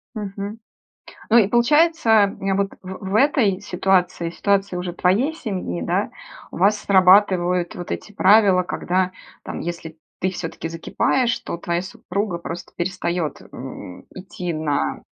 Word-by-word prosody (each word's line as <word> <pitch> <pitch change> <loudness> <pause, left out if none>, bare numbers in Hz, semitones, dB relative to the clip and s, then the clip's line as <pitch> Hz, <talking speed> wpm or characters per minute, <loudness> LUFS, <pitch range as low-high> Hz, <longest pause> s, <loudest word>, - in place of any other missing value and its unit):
Мгм. 205 +1 -5 0.7
Ну, 225 - +6
и 215 -5 +5
получается, 240 -3 +3
вот 195 0 0
в 185 0 -8
в - - 0
этой 220 -7 +3
ситуации, 180 -3 0
ситуации 200 +1 0
уже 180 0 -4
твоей 200 - +1
семьи, 185 - -4
да, - - 0 0.4
у - - -8
вас 200 +4 +3
срабатывают 185 -2 +4
вот 175 - -7
эти - - -5
правила, 195 -2 +5
когда, 185 +1 -1 0.3
там, - - -6
если 165 -2 -6 0.2
ты 185 - 0
всё-таки 165 -2 -5
закипаешь, 235 +9 0
то - - -6
твоя 170 0 -2
супруга 190 0 -4
просто 170 0 -7
перестает, 175 -3 -2
м, 125 -8 -9
идти 180 -2 -6
на 155 -2 -1
185 Hz, 135 wpm, -22 LUFS, 175-205 Hz, 0.7 s, Ну